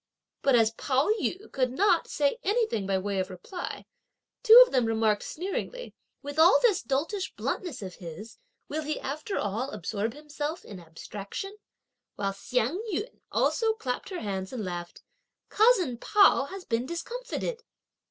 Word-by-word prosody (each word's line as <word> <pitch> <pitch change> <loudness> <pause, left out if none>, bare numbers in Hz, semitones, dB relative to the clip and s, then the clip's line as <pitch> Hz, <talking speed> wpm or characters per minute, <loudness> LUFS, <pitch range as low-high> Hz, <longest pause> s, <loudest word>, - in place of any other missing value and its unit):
But 275 -2 +4
as 225 -2 +4
Pao 265 - 0
yü 385 +4 -3
could 255 -2 0
not, 375 +1 +3
say 290 - 0
anything 425 - 0
by 195 -1 +2
way 195 0 -2
of 185 0 -2
reply, 190 - -7 0.6
two 450 +2 +10
of - - -12
them 250 -3 +2
remarked 220 -2 +2
sneeringly: 395 +8 -5 0.3
"With 285 +2 -5
all 335 +4 +8
this 425 -7 +4
doltish 310 - -2
bluntness 315 - -3
of 185 -1 -6
his 180 - -10 0.3
will 310 +2 -3
he 305 0 -3
after 305 +8 -4
all 220 +7 -2
absorb 220 - -3
himself 300 +2 -5
in 200 -3 -9
abstraction?" 200 - -7 0.6
While 195 -1 -1
Hsiang 250 - -1
yün 415 +7 -4
also 450 -1 +2
clapped 255 - -4
her 370 -3 -5
hands 190 -2 -3
and 230 -5 -4
laughed, 175 -1 -6 0.5
"Cousin 395 - +3
Pao 400 -6 +5
has 380 +4 -8
been 235 +2 -1
discomfited." 480 - -4
275 Hz, 150 wpm, -28 LUFS, -, 0.6 s, two